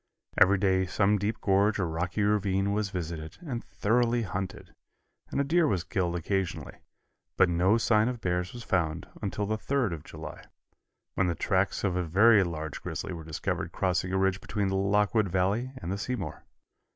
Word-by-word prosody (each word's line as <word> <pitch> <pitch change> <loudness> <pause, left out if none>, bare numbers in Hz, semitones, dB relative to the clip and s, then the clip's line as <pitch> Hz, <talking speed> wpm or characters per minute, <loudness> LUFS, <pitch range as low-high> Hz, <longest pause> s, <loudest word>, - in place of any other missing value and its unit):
Every 100 +2 +5
day 95 -1 +2
some 100 +2 +2
deep 105 +3 -2
gorge 100 +2 +3
or 95 - 0
rocky 85 +5 -1
ravine 100 -1 +1
was 105 -1 0
visited 80 -3 -5
and 120 -6 -4
thoroughly 120 +2 +1
hunted, 95 -1 -5 0.6
and - - -2
a - - +3
deer 160 +3 +3
was 95 - 0
killed 90 -2 -1
occasionally, 90 +1 -3 0.6
but 95 -1 +5
no 90 +5 +3
sign 110 -1 +3
of 125 -1 -3
bears 90 -2 -1
was 120 -1 -8
found 85 -3 -1
until 105 0 -2
the 110 +2 -2
3d 130 -9 0
of 80 -3 -7
July, 80 -1 -9 0.7
when 95 - +1
the 85 - 0
tracks 95 +4 0
of 95 -3 +1
a 90 - +1
very 100 +5 +5
large 80 -4 -5
grizzly - - -4
were 85 -2 -7
discovered 80 -1 -3
crossing 90 0 0
a 95 - +1
ridge 95 0 +1
between 100 -2 -1
the 95 - -1
Lockwood 105 +2 +2
Valley 100 +8 0
and 95 -8 -5
the 100 - -2
Seymour. 105 -8 -4
95 Hz, 180 wpm, -28 LUFS, 90-105 Hz, 0.7 s, Every